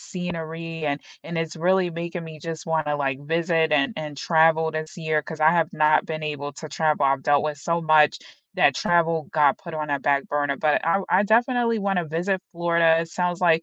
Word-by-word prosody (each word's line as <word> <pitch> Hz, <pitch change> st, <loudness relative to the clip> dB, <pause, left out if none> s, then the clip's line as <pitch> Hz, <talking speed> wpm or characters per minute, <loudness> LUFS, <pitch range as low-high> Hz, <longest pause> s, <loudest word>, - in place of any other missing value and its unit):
scenery, 165 Hz, -2 st, -6 dB
and 145 Hz, 0 st, -1 dB, 0.2 s
and 170 Hz, -, -6 dB
it's 165 Hz, 0 st, -3 dB
really 180 Hz, +1 st, +1 dB
making 170 Hz, 0 st, -5 dB
me 160 Hz, -1 st, -10 dB
just 165 Hz, 0 st, -6 dB
want 160 Hz, -2 st, -1 dB
to, 150 Hz, 0 st, 0 dB
like, 135 Hz, -2 st, -1 dB
visit 165 Hz, +1 st, 0 dB
and 140 Hz, -2 st, +2 dB
and 150 Hz, -2 st, -6 dB
travel 160 Hz, +1 st, +3 dB
this 155 Hz, +1 st, -6 dB
year 155 Hz, -2 st, 0 dB
'cause 155 Hz, +1 st, -8 dB
I 155 Hz, -, +6 dB
have 165 Hz, -2 st, +2 dB
not 155 Hz, 0 st, +3 dB
been 155 Hz, -1 st, -5 dB
able 145 Hz, -2 st, -5 dB
to 155 Hz, 0 st, -9 dB
travel, 155 Hz, -3 st, +1 dB
I've 135 Hz, -1 st, +1 dB
dealt 145 Hz, +1 st, +3 dB
with 150 Hz, -1 st, -3 dB
so 170 Hz, +3 st, -2 dB
much 155 Hz, -2 st, +4 dB, 0.4 s
that -, -, +3 dB
travel 165 Hz, -2 st, +1 dB
got 145 Hz, -3 st, +3 dB
put 170 Hz, -3 st, -9 dB
on 150 Hz, -1 st, -4 dB
a 140 Hz, -, -1 dB
back 140 Hz, 0 st, +1 dB
burner, 145 Hz, -1 st, -1 dB
but 150 Hz, -1 st, +1 dB
I 195 Hz, +4 st, +2 dB
I 185 Hz, -, +4 dB
definitely 235 Hz, +1 st, +2 dB
wanna 195 Hz, -4 st, -1 dB
visit 180 Hz, +4 st, -1 dB
Florida, 170 Hz, -1 st, +3 dB
it 165 Hz, -, -5 dB
sounds 180 Hz, +1 st, -2 dB
like 165 Hz, -1 st, +4 dB
160 Hz, 210 wpm, -23 LUFS, 150-170 Hz, 0.4 s, I